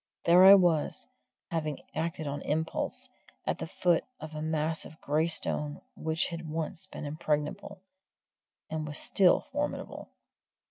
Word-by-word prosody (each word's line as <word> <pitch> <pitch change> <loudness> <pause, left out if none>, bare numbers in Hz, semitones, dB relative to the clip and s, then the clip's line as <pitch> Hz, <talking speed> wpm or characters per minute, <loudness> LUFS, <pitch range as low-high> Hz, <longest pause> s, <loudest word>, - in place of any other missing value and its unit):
There 180 +2 +7
I 195 +1 +11
was 175 -5 +2 0.5
having 155 -3 -2 0.2
acted 160 0 -2
on 145 0 -3
impulse 155 - -2 0.4
at - - -1
the - - -4
foot 175 0 +2 0.2
of 155 0 -8
a 155 - -5
mass 160 0 -1
of 155 - -12
grey 155 +3 +1
stone 150 -2 -1 0.2
which 160 +1 -1
had 170 -1 -6
once 165 +3 -2
been 155 - -7
impregnable, 155 +6 -3 0.8
and 155 -1 -4
was 150 0 -3
still 190 -3 +4
formidable! 290 +2 -4
160 Hz, 140 wpm, -30 LUFS, 150-170 Hz, 0.8 s, I